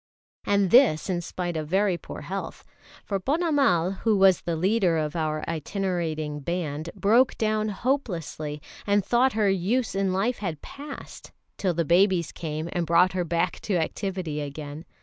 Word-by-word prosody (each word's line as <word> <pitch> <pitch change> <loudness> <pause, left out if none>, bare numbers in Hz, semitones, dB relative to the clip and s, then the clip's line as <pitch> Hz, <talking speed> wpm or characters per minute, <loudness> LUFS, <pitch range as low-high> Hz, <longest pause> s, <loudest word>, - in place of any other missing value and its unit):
And 200 -2 +2
this 235 - +5
in 175 -1 -1
spite 175 0 -4
of 155 -1 -3
very 190 +2 +2
poor - - -8
health. - - -6 0.4
For 200 -2 -1
Ponnamal, 270 - +2
who 220 -3 +2
was 190 -2 +5
the 170 - -2
leader 185 0 +2
of 155 +1 -2
our 155 -2 -2
itinerating 165 -3 -2
band, 160 0 -3
broke 235 +6 +3
down 215 -1 0
hopelessly, 175 - -3 0.2
and 200 -1 +2
thought 250 +4 +3
her 215 -1 +2
use 195 +6 +1
in 195 -1 0
life 205 +7 0
had 175 -7 -4
passed 285 0 -9 0.2
till 185 -4 -1
the 170 0 0
babies 175 0 +3
came 155 -1 -4
and 175 -3 -1
brought 175 +3 +4
her 185 -1 0
back 170 +1 -1
to 200 - -2
activity 170 -2 -2
again. 145 +2 -7
180 Hz, 160 wpm, -26 LUFS, 160-205 Hz, 0.4 s, this